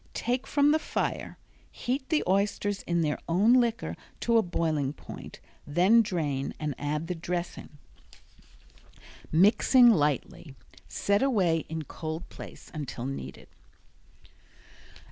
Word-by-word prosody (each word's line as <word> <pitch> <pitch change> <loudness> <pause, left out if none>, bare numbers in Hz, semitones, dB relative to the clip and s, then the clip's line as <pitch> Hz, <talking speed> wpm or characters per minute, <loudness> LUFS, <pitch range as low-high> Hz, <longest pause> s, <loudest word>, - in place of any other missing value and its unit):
Take 250 +1 -1
from 285 0 +3
the 310 - +3
fire. - - -3 0.3
Heat 260 +2 -3
the 315 - +2
oysters 200 +1 0
in 170 0 +1
their 150 -2 0
own 200 +8 +4
liquor 240 -2 +1 0.3
to 235 -1 +3
a - - +4
boiling 155 -6 -1
point - - -10 0.3
then 185 +10 +5
drain 150 -10 -2
and 150 -2 -2
add 150 +2 -2
the 180 - -3
dressing, 170 -2 -5 1.5
mixing 225 - +6
lightly. 145 - -1 0.3
Set 200 +2 0
away 185 - +2
in 160 0 -4
cold 160 +2 -6
place - - -11
until 135 -6 -5
needed. 130 - -6
175 Hz, 120 wpm, -28 LUFS, 150-230 Hz, 1.5 s, mixing